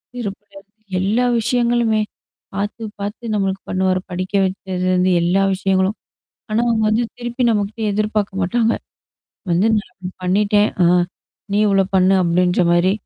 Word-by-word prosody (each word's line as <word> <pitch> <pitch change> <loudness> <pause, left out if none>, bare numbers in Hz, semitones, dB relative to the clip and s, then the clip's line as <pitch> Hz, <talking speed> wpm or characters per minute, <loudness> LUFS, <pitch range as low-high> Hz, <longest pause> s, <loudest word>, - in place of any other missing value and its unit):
செருப்புல 205 -3 -6
இருந்து 205 +2 -19 0.2
எல்லா 220 +6 +1
விஷயங்களுமே. 235 -1 +1 0.6
பாத்து, 205 +3 -3 0.2
பாத்து 205 +4 -5
நம்மளுக்கு 195 -1 -1
பண்ணுவாரு. 185 0 +1
படிக்க 185 +2 -4
வச்சதுலருந்து 185 -1 0
எல்லா 180 +3 +2
விஷயங்களும். 190 +1 +1 0.6
ஆனா, 215 - +1
அவுங்க 225 -2 +1
வந்து 225 +3 +2
திருப்பி 240 +1 -3
நம்மக்கிட்ட 210 +1 -1
எதிர்பார்க்க 210 -2 -1
மாட்டாங்க. 225 +5 +1 0.8
வந்து 175 +5 +3
நான் 185 -3 -8
பண்ணிட்டேன். 205 +3 +2 0.2
ஆ. - - +5 0.7
நீ 205 - +2
இவளோ 195 -1 +3
பண்ணு 190 0 +4
அப்பிடின்ற 180 +1 +2
மாரி. 175 +2 +3
200 Hz, 130 wpm, -19 LUFS, 185-215 Hz, 0.8 s, ஆ